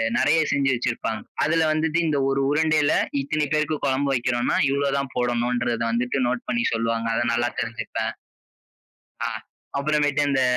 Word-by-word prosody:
நெறைய 145 +6 +3
செஞ்சு 140 -1 +2
வச்சிருப்பாங்க. 115 -2 -2 0.2
அதுல 160 +2 +2
வந்துட்டு 155 +1 +1
இந்த 150 -2 +1
1 135 0 +1
உருண்டையில 155 0 +3 0.3
இத்தனை 150 +2 -1
பேருக்கு 155 0 +1
குழம்பு 135 +1 +1
வைக்கிறோனா, 120 -1 0
இவ்வளவு 140 0 0
தான் 140 -1 -3
போடணுன்றத 120 -1 0
வந்துட்டு 125 +3 0
நோட் 120 -1 -2
பண்ணி 235 +3 0
சொல்லுவாங்க. 115 0 -1
அதை 120 - +1
நல்லா 120 +1 +1
தெரிஞ்சுப்பேன். 115 0 -3 1.1
ஆ, - - -1 0.5
அப்புறமேட்டு 145 0 +1
இந்த 135 -1 +2
135 Hz, 140 wpm, -24 LUFS, 120-150 Hz, 1.1 s, நெறைய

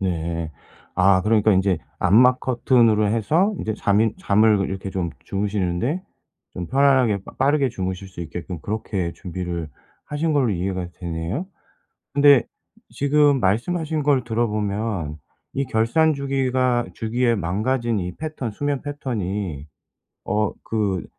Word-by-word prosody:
네. 85 -3 -2 0.4
아 95 0 +4
그러니까 110 0 +3
인제 95 -2 +2 0.2
암막 125 +8 +5
커튼으로 115 -4 +3
해서 160 - +2
이제 110 - -2
잠이 105 +1 +2
잠을 105 -1 +3
이렇게 95 0 -5
좀 90 -3 -2
주무시는데 100 - -1 0.5
좀 90 -2 -5
편안하게 130 -7 +3
빠 - - -11
빠르게 140 0 +3
주무실 95 -3 -4
수 95 - -10
있게끔 85 0 -6
그렇게 100 -4 -3
준비를 90 -3 -5 0.4
하신 155 +2 -1
걸로 135 -6 +2
이해가 90 0 -2
되네요. 85 - -4 0.7
근데 140 -2 +6 0.5
지금 145 0 +3
말씀하신 150 - 0
걸 140 -4 +3
들어보면 105 -7 -2 0.4
이 135 0 -1
결산 125 +9 +2
주기가 130 -3 0
주기에 120 +2 0
망가진 110 +5 -1
이 90 0 -5
패턴 155 -7 -5
수면 145 +4 -2
패턴이 100 - -4 0.6
어 105 +1 0
그 100 -5 -1
110 Hz, 280 characters per minute, -22 LUFS, 95-130 Hz, 0.7 s, 근데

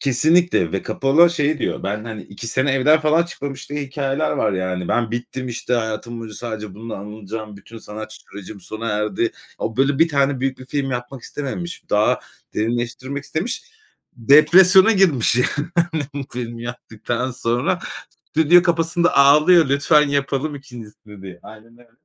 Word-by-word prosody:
Kesinlikle 150 - +2
ve 95 - -2
Cappola 150 +6 +4
şey 150 -2 0
diyor, - - -3
ben, 105 +3 -3
hani, 110 -2 -7
2 100 +4 -9
sene 130 +4 +1
evden 150 +4 +4
falan 155 +2 +3
çıkmamış 140 -5 -7
diye 145 - -3
hikâyeler 140 +2 -2
var, 105 - 0
yani. 95 -1 -3
"Ben 120 -2 0
bittim, 120 +2 -5
işte, 120 +1 -2
hayatım 115 0 -3
boyunca 110 -2 -8
sadece 110 -4 -6
bununla 110 +2 -7
anılacağım, 105 +1 -8
bütün 115 +3 -13
sanat 110 0 -9
sürecim 100 0 -11
sona 110 +5 -6
erdi." 105 +1 -1 0.3
O, 110 - -4
böyle, 135 +1 +2
bir 165 - +5
tane 140 -3 +1
büyük 135 0 -2
bir 130 - -12
film 135 0 -2
yapmak 120 +1 -6
istememiş, 170 +5 -6
daha 105 +1 +2 0.3
derinleştirmek 120 +5 -3
istemiş. 160 - -3 0.5
Depresyona 180 - +6
girmiş 165 - +3
yani. 145 +4 0 0.5
Bu 145 - -3
filmi 120 -1 -6
yaptıktan 120 +1 -4
sonra 120 0 -1 0.5
stüdyo 160 +3 +5
kapısında 170 0 +1
ağlıyor. 150 +4 +6
Lütfen 145 +2 +3
yapalım 140 +1 -1
2'ncisini 110 -6 -13
diye. 95 -2 -10
Aynen 115 +2 -15
öyle. 120 -1 -22
130 Hz, 155 wpm, -20 LUFS, 110-145 Hz, 0.5 s, Depresyona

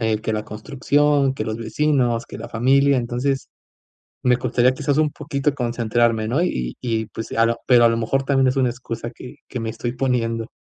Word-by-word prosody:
eh, 110 -1 +1
que 110 - -2
la 105 0 -3
construcción, 140 +5 +1
que 110 - -3
los 110 0 -3
vecinos, 120 0 0
que - - -9
la - - -7
familia, 135 +4 +3
entonces 125 +3 -2 0.7
me 125 -1 +3
costaría 125 0 +2
quizás 145 +1 0
un 155 -1 +3
poquito 145 -1 -2
concentrarme, 120 -3 0
¿no?, 140 +9 +1
y 60 - -2
y 115 -3 -1
pues 110 +1 -7
a 115 0 +3
lo 115 0 0
pero 120 -2 +6
a - - +7
lo 115 - +1
mejor 135 +4 0
también 135 -1 +3
es 130 - 0
una 130 -2 +2
excusa 120 -1 -6
que 125 +5 -11
que 125 - -5
me 115 - -3
estoy 120 +1 -4
poniendo. 115 -3 -1
120 Hz, 205 wpm, -21 LUFS, 115-135 Hz, 0.7 s, a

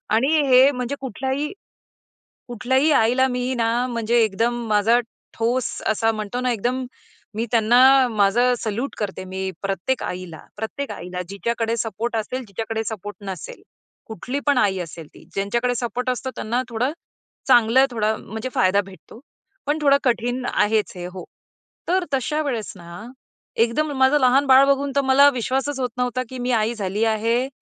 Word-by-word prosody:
आणि 245 +4 +2 0.2
हे 260 +2 +7
म्हणजे 250 +1 -3
कुठल्याही 265 - -3 1.0
कुठल्याही 260 +5 +1
आईला 250 +1 +3
मी 250 0 -2
ना 230 -2 +1 0.2
म्हणजे 235 -1 0
एकदम 225 +3 0
माझा 215 +3 +3 0.4
ठोस 235 +2 0 0.2
असा 225 +1 +2
म्हणतो 215 +2 -4
ना, 255 -1 +1
एकदम 245 +4 -1 0.5
मी 225 +2 -1
त्यांना 250 +4 +5
माझं 225 +4 +3
सल्यूट 230 +5 -3
करते 195 -3 -4
मी 190 +1 -4
प्रत्येक 195 +6 -2
आईला. 180 -3 -6 0.2
प्रत्येक 220 +6 -4
आईला 180 +1 -6
जिच्याकडे 230 +3 -2
सपोर्ट 225 +2 -3
असेल, 255 +4 -3
जिच्याकडे 220 +3 -4
सपोर्ट 205 -2 -6
नसेल. 185 -4 -7 0.5
कुठली 250 +6 -4
पण 285 -2 +4
आई 195 -6 +2
असेल 165 -2 -7
ती. - - -15
ज्यांच्याकडे 235 +5 0
सपोर्ट 245 +1 -2
असतो 255 +1 -2
त्यांना 240 +3 -1
थोडं, 240 +4 -1 0.6
चांगलं 245 +1 +5
थोडा 220 -2 0
म्हणजे 220 +4 -6
फायदा 190 +2 +3
भेटतो. 190 +2 -14 0.5
पण 295 +1 +1
थोडं 280 -1 +5
कठीण 245 +1 0
आहेच 215 0 +1
हे 175 - -6
हो. 180 0 -8 0.6
तर 370 +1 +1
तशा 300 +3 0
वेळेस 235 -8 -3
ना 170 +4 -10 0.6
एकदम 295 +7 -1
माझं 265 +3 +5
लहान 265 +2 +4
बाळ 265 +1 +7
बघून 280 0 +1
तर 280 - +4
मला 275 +2 +6
विश्वासच 265 +3 -2
होत 250 - -1
नव्हता 250 0 -1
की 260 - -7
मी 245 +1 -1
आई 220 +2 0
झाली 205 0 -2
आहे 230 +3 +1
235 Hz, 155 wpm, -22 LUFS, 215-260 Hz, 1.0 s, हे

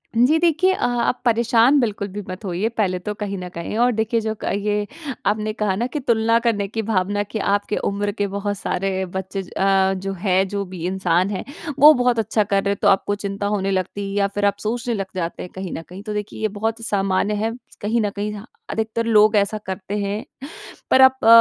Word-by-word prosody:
जी, 250 +8 +4
देखिए 345 +3 +3
अ - - -1 0.2
आप 250 - -1
परेशान 235 +3 +4
बिल्कुल 210 -5 -1
भी 205 +1 -6
मत 185 +3 -7
होइए, 190 +4 -1
पहले 200 -6 -1
तो 210 +4 -4
कहीं 205 -1 -4
न 180 0 -6
कहीं 170 +5 -4
और 245 +1 +4
देखिए 225 +1 0
जो 220 0 -2
क - - -2
अ, - - 0
ये 205 +1 -1 0.4
आपने 215 +1 0
कहा 210 -3 0
न 235 +5 -1
कि 300 - -1
तुलना 230 -3 +2
करने 220 -4 0
की 225 +2 -3
भावना 205 -1 0
कि 210 +2 -5
आपके 205 +1 0
उम्र 205 +1 -1
के 205 -1 -2
बहुत 200 +1 -3
सारे 190 0 -1
बच्चे 190 +2 -4
जो 180 - -12
अ, 195 0 +3
जो 195 +1 -4
हैं 190 0 +1
जो 200 +1 -2
भी 180 -2 -7
इंसान 185 0 +1
हैं, 195 - -3 0.4
वो 300 +2 +10
बहुत 245 -2 +2
अच्छा 215 0 +1
कर 200 -1 0
रहे 200 - +1
हैं 200 - -1
तो 205 - +3
आपको 200 +1 +3
चिंता 200 0 -3
होने 195 -1 0
लगती 195 +1 -2
है 195 - -5
या 200 - +3
फिर 205 +1 -2
आप 200 0 +2
सोचने 235 +2 -1
लग 195 -3 -2
जाते 170 -2 -3
हैं 180 - -9
कहीं 190 -2 -5
न - - -5
कहीं। 190 +3 -9
तो 215 - -4
देखिए 210 +1 -5
ये 215 - +2
बहुत 220 +2 -3
सामान्य 195 0 +1
है। 225 - -1 0.3
कहीं 225 +3 +1
न 210 - +1
कहीं 205 +1 -4
ह 205 +1 -9 0.2
अधिकतर 225 +1 -2
लोग 215 -1 +5
ऐसा 200 +1 +1
करते 190 +2 -4
हैं। 205 +1 -2 0.7
पर 260 - +6
आप 260 0 +7
अ, - - +3
205 Hz, 235 wpm, -21 LUFS, 195-225 Hz, 0.7 s, वो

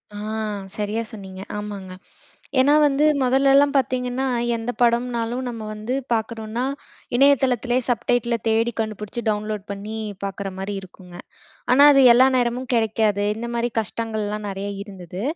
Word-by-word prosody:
ஆ! - - -6 0.6
சரியா 210 +2 -1
சொன்னீங்க 190 -3 -9 0.2
ஆமாங்க. 205 -3 -6 0.7
ஏன்னா 285 +3 +5
வந்து 290 0 +3 0.2
மொதல்லலாம் 275 +2 +4
பாத்தீங்கன்னா, 255 0 0 0.3
எந்த 225 +2 -3
படம்னாலும் 240 0 +1
நம்ம 230 -2 -6
வந்து 215 +4 -4 0.2
பார்க்குறோன்னா, 225 +1 -2 0.5
இணையதளத்திலயே 255 -2 +3
சப்டைட்டில 235 0 +1
தேடி 225 +2 +2
கண்டுபுடிச்சு, 215 +1 -4
டவுன்லோட் 210 -1 -2
பண்ணி 205 +2 -5 0.3
பார்க்குற 195 0 -4
மாரி 195 +2 -4
இருக்குங்க. 180 -1 -14 0.6
ஆனா 280 +3 +7
அது 275 - +6
எல்லா 255 +2 +6
நேரமும் 245 +1 -1
கெடைக்காது. 220 -3 +1
இந்த 235 +2 -5
மாரி 235 +1 0
கஷ்டங்கள்லாம் 215 -1 -3
நெறையா 195 +1 -4
இருந்தது. 185 -3 -9
225 Hz, 125 wpm, -22 LUFS, 210-245 Hz, 0.7 s, ஆனா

